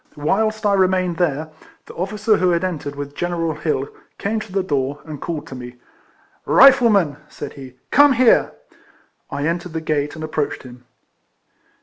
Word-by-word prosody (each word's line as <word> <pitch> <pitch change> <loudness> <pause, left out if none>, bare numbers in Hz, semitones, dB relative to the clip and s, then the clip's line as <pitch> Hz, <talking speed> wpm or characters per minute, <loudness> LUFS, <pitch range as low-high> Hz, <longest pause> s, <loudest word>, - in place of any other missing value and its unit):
Whilst 215 +8 0
I 205 - +3
remained 185 -2 +2
there, 155 -2 -1 0.3
the - - -12
officer 210 +4 0
who 185 - +2
had 170 0 +1
entered 155 -6 -3
with 145 0 -6
General 170 -1 -2
Hill 150 -3 -2 0.3
came 220 +2 -2
to 215 -2 -9
the 195 0 0
door, 145 -4 -2
and 155 -3 -8
called 155 -3 -4
to 135 - -10
me. 125 -1 -9 0.4
" - - -36
Rifleman," 225 - +6
said - - -8
he, 130 -3 -11
" - - -47
come 285 0 +6
here." 250 -1 +4 0.8
I 145 +1 -3
entered 170 +1 -2
the 160 - -2
gate, 150 -2 -1
and 155 - -7
approached 155 -2 -3
him. 125 -1 -13
165 Hz, 175 wpm, -20 LUFS, 145-195 Hz, 0.8 s, Rifleman